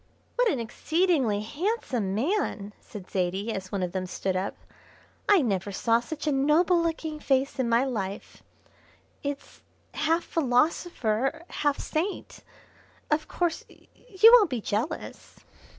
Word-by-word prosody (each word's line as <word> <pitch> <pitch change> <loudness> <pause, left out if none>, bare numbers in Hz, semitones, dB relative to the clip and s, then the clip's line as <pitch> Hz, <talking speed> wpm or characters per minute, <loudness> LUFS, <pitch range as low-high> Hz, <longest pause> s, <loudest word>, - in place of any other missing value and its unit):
"What - - +3
an 275 - 0
exceedingly 265 - +1
handsome 260 - -2
man!" 225 - -1
said 195 -3 -11
Zaidie, 190 +4 -1
as 190 -2 -6
one 195 -2 -1
of 180 - -2
them 185 0 -3
stood 185 +1 -2
up. 185 +2 -2 0.7
"I 395 -7 +6
never 200 -3 -1
saw 230 +4 +2
such 300 +6 -6
a 300 - +2
noble 310 +6 +3
looking 320 -2 -3
face 270 -1 0
in 245 -2 +1
my 235 +2 +4
life; 205 -7 -4 0.8
it's 285 0 -6 0.3
half 325 +2 +1
philosopher, 270 -1 0
half 290 -1 0
saint. 355 +6 -3 0.7
Of 305 +1 +1
course, 345 -2 -1
you 445 -1 +3
won't 435 -7 +7
be 250 -3 -2
jealous?" 225 +9 -4
270 Hz, 135 wpm, -27 LUFS, 210-330 Hz, 0.8 s, won't